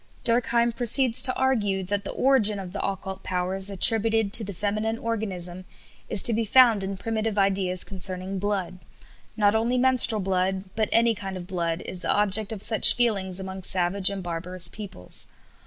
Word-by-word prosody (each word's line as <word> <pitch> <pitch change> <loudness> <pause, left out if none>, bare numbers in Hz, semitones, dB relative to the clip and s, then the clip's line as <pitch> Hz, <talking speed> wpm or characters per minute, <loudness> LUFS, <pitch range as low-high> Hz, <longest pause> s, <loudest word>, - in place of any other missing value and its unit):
Durkheim 235 0 +1
proceeds 240 +1 +3
to 255 - 0
argue 210 -8 -1
that 200 +2 -4
the - - -4
origin 240 -6 +2
of 190 -2 -9
the 200 - -5
occult 190 0 -6
powers 185 +2 -3
attributed 220 +1 +3
to 225 - +5
the 200 - -6
feminine 215 +4 -3
organism 185 -6 -5 0.5
is 195 - +3
to 235 - +7
be 230 +1 -1
found 230 -1 +4
in 195 0 -5
primitive 220 0 -4
ideas 190 -2 0
concerning 185 0 -2
blood. 190 -2 -4 0.6
Not 205 -1 +2
only 230 +3 -1
menstrual 250 -4 +4
blood 190 0 -2
but 215 0 -1
any 230 0 +3
kind 195 -3 -8
of 175 - -9
blood 170 -2 -4
is 185 - -8
the - - -6
object 205 +1 0
of 210 -3 -3
such 220 -2 +6
feelings 195 -6 -1
among 190 0 -8
savage 185 +1 0
and 200 -1 -6
barbarous 175 +1 0
peoples. 195 - -4
200 Hz, 170 wpm, -24 LUFS, 185-225 Hz, 0.6 s, to